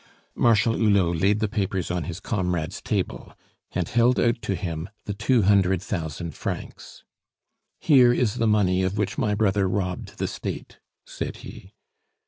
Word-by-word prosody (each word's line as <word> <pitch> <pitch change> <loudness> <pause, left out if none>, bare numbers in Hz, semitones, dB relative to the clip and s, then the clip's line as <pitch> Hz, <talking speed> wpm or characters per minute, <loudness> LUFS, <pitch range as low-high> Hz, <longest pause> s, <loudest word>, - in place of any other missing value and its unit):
Marshal 115 -1 +3
Hulot 95 -7 +2
laid 105 +2 +2
the 110 - +2
papers 95 -4 -2
on 90 -1 -2
his 85 0 -6
comrade's 90 -7 -2
table, - - -3 0.4
and - - -1
held 120 +2 +3
out 120 0 +1
to 95 - -2
him 85 -1 -4 0.2
the 105 - -3
two 120 +2 +2
hundred 95 -2 +3
thousand 85 -4 -4
francs. - - -7 0.8
"Here 130 -6 +6
is 120 -3 0
the 115 - +1
money 95 -4 +3
of 95 +2 -1
which 105 +6 -1
my 105 -5 +1
brother 100 -2 +1
robbed 90 -2 -3
the - - -1
State," - - -6 0.3
said - - -5
he. - - -12
100 Hz, 155 wpm, -24 LUFS, 90-110 Hz, 0.8 s, Here